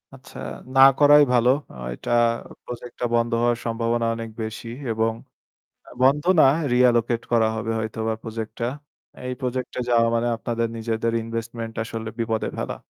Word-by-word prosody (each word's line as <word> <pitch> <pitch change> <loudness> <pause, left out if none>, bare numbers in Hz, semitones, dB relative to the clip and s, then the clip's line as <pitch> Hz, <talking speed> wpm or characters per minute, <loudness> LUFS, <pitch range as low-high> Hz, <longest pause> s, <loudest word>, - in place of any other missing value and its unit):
আচ্ছা, 135 0 -14 0.4
না 135 - +6 0.2
করাই 145 0 +7
ভালো। 120 0 +4 0.2
আ - - -12 0.2
এটা - - -6 0.5
project 120 0 -8
টা 125 - 0
বন্ধ 115 0 +1
হওয়ার 120 0 +2
সম্ভাবনা 115 0 0
অনেক 115 0 -6
বেশি 110 +2 -6 0.2
এবং 110 0 +1 0.8
আ - - -14
বন্ধ 140 +3 +4 0.2
না, - - +8 0.3
reallocate 120 -2 +3
করা 115 -2 +4
হবে 110 0 -3
হয়তোবা 110 0 -2
project 110 -1 -5
টা। 115 - 0 0.6
এই 125 - -2
project 125 0 -2
এ - - 0
যাওয়া 115 -1 +4
মানে 115 +1 +1
আপনাদের 115 0 -2
নিজেদের 115 0 -1
investment 115 0 -5
আসলে 115 -1 -6
বিপদে 115 -1 -1
ফেলা। - - -3
115 Hz, 160 wpm, -23 LUFS, 115-120 Hz, 0.8 s, না